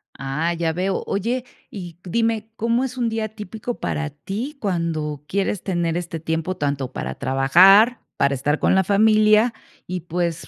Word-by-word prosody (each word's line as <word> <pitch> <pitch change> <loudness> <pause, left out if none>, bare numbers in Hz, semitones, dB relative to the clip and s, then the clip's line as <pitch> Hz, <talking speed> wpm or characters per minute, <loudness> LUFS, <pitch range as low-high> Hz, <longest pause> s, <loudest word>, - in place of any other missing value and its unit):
Ah, 150 +5 -2
ya 165 -1 -1
veo. 185 +3 -1
Oye, 235 +6 -1 0.2
y 175 -4 -9
dime, 225 +3 -1
¿cómo 230 +3 +1
es 260 -1 -4
un 240 -2 +1
día 220 -1 -2
típico 220 +2 -6
para 155 0 -2
ti, 210 - -6
cuando 165 - -2
quieres 195 +1 -1
tener 175 -3 -1
este 170 -2 -4
tiempo 160 +3 -2
tanto 140 -4 -2
para - - -5
trabajar, 190 - +5 0.2
para 140 0 +2
estar 145 +3 0
con - - +3
la 190 - +4
familia 215 +3 +4 0.3
y, 180 0 -4
pues, 170 0 -3
185 Hz, 160 wpm, -22 LUFS, 160-220 Hz, 0.3 s, trabajar